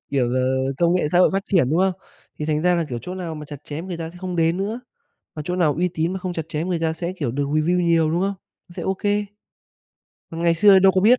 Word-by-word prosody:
Kiểu 130 -4 +1
là 130 +1 0
công 170 0 +3
nghệ 180 -5 +1
xã 175 - +4
hội 180 - +5
phát 195 0 0
triển, 165 -10 +2
đúng 165 - +2
không? 190 0 +3 0.5
Thì 150 - -3
thành 155 0 0
ra 180 0 +3
là, 170 -2 0
kiểu, 120 -3 -4
chỗ 180 - -6
nào 175 -4 -5
mà 150 - -7
chặt 145 -1 -10
chém 155 +4 -6
người 180 - -4
ta 165 -1 -5
sẽ 175 - -15
không 180 -1 -4
đến 165 +1 +2
nữa, 210 +5 -3 0.6
mà 155 - -4
chỗ 180 - -1
nào 160 -5 +2
uy 180 +2 +1
tín 165 +2 -1
mà 190 - -4
không 180 -1 -4
chặt 160 -1 -5
chém 155 +3 -2
người 175 -2 0
ta 160 -1 0
sẽ, 170 +2 -4
kiểu, 135 -7 -2
được 140 +2 -1
review 155 +5 +1
nhiều, 165 -2 +3
đúng 170 +2 0
không? 200 +1 0 0.4
Nó 175 - -14
sẽ - - -5
OK. 190 +1 -3 1.3
Còn 165 +1 -5
ngày 170 -1 +3
xưa 195 +3 +7
đâu 190 0 +5
có 185 - +2
biết. 235 +6 +5
170 Hz, 285 wpm, -22 LUFS, 155-185 Hz, 1.3 s, xưa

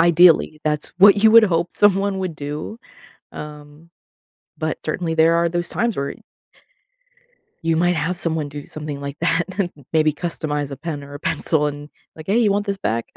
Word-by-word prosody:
ideally, 170 -2 +4
that's 150 -1 0
what 200 +1 +7
you 220 - +7
would 230 0 +8
hope 170 -3 0
someone 200 -1 +2
would 185 -3 -3
do, 150 +9 -6 0.5
um, 150 +2 -11 0.7
but 155 0 -3
certainly 165 +1 -2
there 160 +1 +4
are 170 0 +2
those 175 +1 0
times 235 -3 -1
where 140 0 -3 1.5
you 165 0 +1
might 175 +2 +2
have 165 +4 -2
someone 160 -4 -1
do 145 0 -8
something 150 -2 -6
like 140 +1 -6
that, 165 +2 +1
and 185 -3 0 0.2
maybe 155 -1 +3
customize 150 -3 -3
a 140 - -6
pen 150 0 -6
or 140 0 -11
a 145 - -8
pencil 160 -1 0
and, 145 0 -6 0.3
like, 155 -1 -11
"Hey, 205 +4 +2
you 215 -4 +3
want 205 +1 -1
this 200 -1 -1
back?" 115 - -2
160 Hz, 180 wpm, -21 LUFS, 150-180 Hz, 1.5 s, would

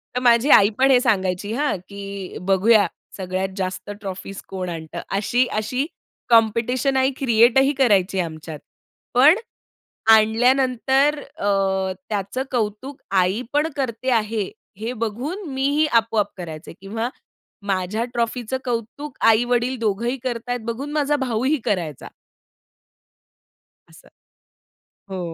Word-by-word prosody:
तर - - +1
माझी 240 +3 +4
आई 200 0 +7
पण 270 +1 +4
हे 250 - +6
सांगायची 195 -4 0
हां, 285 -2 0
की 200 -1 -7
"बघूया 205 +3 +4 0.3
सगळ्यात 190 0 -2
जास्त 185 +1 -4
ट्रॉफीज 195 0 -7
कोण 185 -2 -5
आणतं." 160 -2 -6 0.2
अशी 240 +5 +2
अशी 250 +6 -1 0.4
कॉम्पिटिशन 235 +4 +3
आई 265 +1 +3
क्रिएट 235 -1 +4
ही 270 +2 +3
करायची 200 -7 +3
आमच्यात. 160 -2 -5 0.5
पण 280 +8 +7 0.8
आणल्यानंतर 255 +5 +3 0.2
अ, 205 - -2 0.6
त्याचं 210 +5 -2
कौतुक 245 +3 -3
आई 190 +4 +2
पण 295 +2 +2
करते 255 -1 -2
आहे, 220 -3 0 0.3
हे 225 +4 -4
बघून 270 - -4
मीही 285 +3 +2
आपोआप 225 -2 +2
करायचे 160 -2 -8
किंवा 225 +4 -3 0.6
माझ्या 195 +3 -1
ट्रॉफीचं 240 +1 -2
कौतुक 245 +4 -4
आई-वडील 240 +3 +3
दोघंही 230 +4 -1
करताहेत 245 0 -3
बघून, 260 +6 -4
माझा 295 -1 +1
भाऊही 260 +3 0
करायचा. 175 - -2 1.8
असं. - - -18 1.0
हो. 190 -1 -5
230 Hz, 115 wpm, -22 LUFS, 200-260 Hz, 1.8 s, आई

